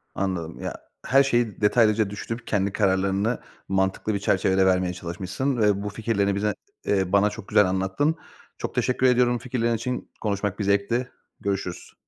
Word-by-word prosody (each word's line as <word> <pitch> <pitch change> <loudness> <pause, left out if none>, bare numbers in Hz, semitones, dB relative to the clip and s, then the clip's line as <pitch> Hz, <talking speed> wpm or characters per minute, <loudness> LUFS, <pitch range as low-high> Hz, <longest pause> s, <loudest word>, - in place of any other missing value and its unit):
Anladım. 90 -4 -3
Ya, - - -4 0.3
her 135 +1 +5
şeyi 120 -7 0
detaylıca 110 -1 +3
düşünüp 115 +4 -6
kendi 100 -1 0
kararlarını 100 +3 +1 0.3
mantıklı 95 +2 0
bir 100 - -1
çerçevede 95 -1 +2
vermeye 90 -1 +2
çalışmışsın 95 +9 -3
ve 105 -3 +2
bu 105 - -2
fikirlerini 105 -2 0
bize 105 +1 0 0.3
eee, 95 -2 +1
bana 100 +1 +4
çok 105 -1 -9
güzel 105 - +5
anlattın. 95 +12 0 0.4
Çok - - -5
teşekkür 125 0 +1
ediyorum 125 -1 +4
bu - - -3
fikirlerin 120 -1 -1
için. 125 +3 -4
Konuşmak 105 -1 -2
bir - - 0
zevkti. 100 +6 +1 0.3
Görüşürüz. 95 -3 -4
100 Hz, 160 wpm, -25 LUFS, 95-115 Hz, 0.4 s, her